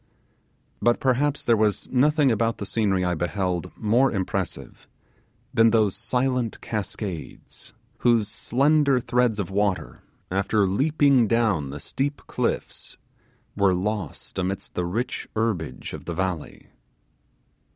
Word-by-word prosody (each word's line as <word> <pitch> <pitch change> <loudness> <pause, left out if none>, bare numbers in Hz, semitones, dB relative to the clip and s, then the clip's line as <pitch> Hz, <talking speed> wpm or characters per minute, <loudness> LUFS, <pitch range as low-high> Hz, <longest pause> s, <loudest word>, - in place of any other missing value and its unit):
But 120 0 +3
perhaps 140 +2 +1
there 115 - +4
was 105 -2 +1
nothing 145 +1 +3
about 115 +1 0
the 100 - -5
scenery 95 -3 +1
I 90 - +1
beheld 90 +1 -2
more 120 +5 +3
impressive 95 -4 -4 0.7
than 115 0 +5
those 110 -3 +2
silent 125 -2 -1
cascades, 100 -5 -6 0.2
whose 115 -4 +3
slender 140 +5 +2
threads 125 -2 +1
of 95 -2 -3
water, 100 -1 -1 0.3
after 100 +2 +2
leaping 135 +3 +3
down 105 -11 +1
the 70 +2 -6
steep 140 - -3
cliffs, - - -3 0.6
were 100 -2 +3
lost 95 -2 -4
amidst 95 +1 -3
the 90 - -1
rich 110 +9 -3
herbage 90 - -2
of - - -8
the 85 - -4
valley. 90 -3 -4
110 Hz, 120 wpm, -24 LUFS, 95-125 Hz, 0.7 s, than